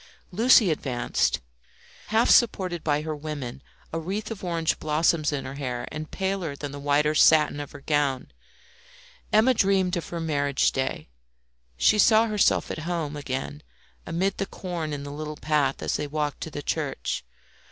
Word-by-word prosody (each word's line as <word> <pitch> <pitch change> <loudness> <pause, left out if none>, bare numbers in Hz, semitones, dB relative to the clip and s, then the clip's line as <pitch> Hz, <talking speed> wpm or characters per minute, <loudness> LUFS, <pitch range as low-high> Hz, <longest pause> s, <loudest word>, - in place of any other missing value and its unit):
Lucie 220 -1 +5
advanced, 130 - 0 0.7
half 225 +2 +3
supported 185 -8 +3
by 150 -1 +1
her 155 -1 -3
women, 145 -4 -6 0.3
a 165 - -1
wreath 195 +7 -4
of 210 -3 -7
orange 165 -3 0
blossoms 155 0 +1
in 140 -2 -3
her 130 - -6
hair, 125 -3 -4
and 155 0 -6
paler 190 -6 -2
than 145 0 -6
the 145 - -7
white 145 +1 +2
satin 150 -1 +5
of 145 - -6
her 145 - -11
gown. 140 - 0 1.0
Emma 220 +5 +5
dreamed 195 -4 +2
of 170 - -4
her 170 - -4
marriage 145 -4 +1
day; 130 -1 -3 0.7
she 210 - +4
saw 220 +2 +6
herself 210 -3 +2
at - - -4
home 160 -4 -2
again 145 +1 -4 0.5
amid 185 +4 -1
the 195 - -1
corn 170 -4 -5
in 145 -1 -4
the 145 - -7
little 150 0 -6
path 145 -3 0
as - - 0
they 150 - -3
walked 150 -1 -3
to - - -4
the 145 -1 -6
church. 150 -3 -2
155 Hz, 165 wpm, -26 LUFS, 145-180 Hz, 1.0 s, saw